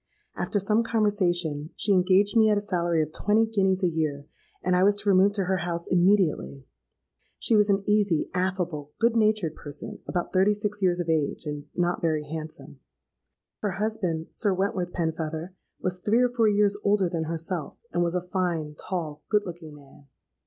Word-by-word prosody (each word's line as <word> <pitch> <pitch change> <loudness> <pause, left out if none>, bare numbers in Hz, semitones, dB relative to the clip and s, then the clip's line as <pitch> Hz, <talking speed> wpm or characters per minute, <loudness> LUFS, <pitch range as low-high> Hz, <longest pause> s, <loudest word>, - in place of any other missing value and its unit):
After 205 - -1
some 210 +3 +2
conversation, 180 -9 0
she 205 -1 +2
engaged 190 +3 +3
me 220 -1 +5
at 210 - +3
a - - +3
salary 170 -5 0
of 155 0 -8
twenty 215 +2 +2
guineas 195 -3 +1
a - - +5
year; 155 -4 -2 0.4
and 180 0 +2
I 180 - +3
was 200 +2 +4
to 205 0 -2
remove 195 +1 +5
to 200 -2 -1
her 190 +1 0
house 170 -1 -3
immediately. 175 - +1 0.7
She 230 - +2
was 210 -1 +4
an 195 0 +2
easy, 205 -6 +2
affable, 180 -5 -2
good 235 0 +2
natured 215 -7 +2
person—about 155 +4 -5
thirty 195 +2 +4
six 210 0 -3
years 180 -2 +2
of 175 - -2
age, 160 -1 0
and 150 -1 -5
not 175 0 0
very 155 -2 0
handsome. 155 +1 -8 0.8
Her 205 -3 -2
husband, 190 -6 -2
Sir 205 -4 0
Wentworth 185 -2 -1
Penfeather, 160 0 -3 0.3
was 185 0 -1
three 215 +6 +2
or 250 - +3
four 235 -2 +2
years 205 -1 +3
older 200 -2 +3
than 165 -2 -2
herself, 165 0 -3 0.2
and 175 - +1
was 170 0 0
a 180 0 -2
fine, 170 -5 -1
tall, 155 -2 -5
good 210 -1 +2
looking 165 -4 -8
man. 145 0 -18
180 Hz, 180 wpm, -26 LUFS, 160-205 Hz, 0.8 s, me